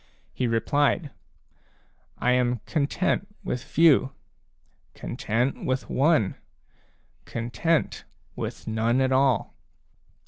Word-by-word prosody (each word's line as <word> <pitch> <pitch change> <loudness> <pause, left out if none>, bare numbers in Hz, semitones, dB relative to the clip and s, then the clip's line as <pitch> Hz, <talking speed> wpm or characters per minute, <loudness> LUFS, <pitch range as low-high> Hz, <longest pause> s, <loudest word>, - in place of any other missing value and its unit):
He 125 - -1
replied: 145 +6 +1 0.5
" - - -37 0.3
I 125 - +1
am 125 -2 +1
content 165 +5 0 0.2
with 125 - -3
few, 145 -4 +4 0.8
content 120 +5 -2
with 130 0 -2
one, 135 - +3 0.9
content 120 +8 -1 0.3
with - - -5
none 115 +3 +1
at 130 0 +2
all." 130 -3 +2
130 Hz, 95 wpm, -26 LUFS, 120-145 Hz, 0.9 s, few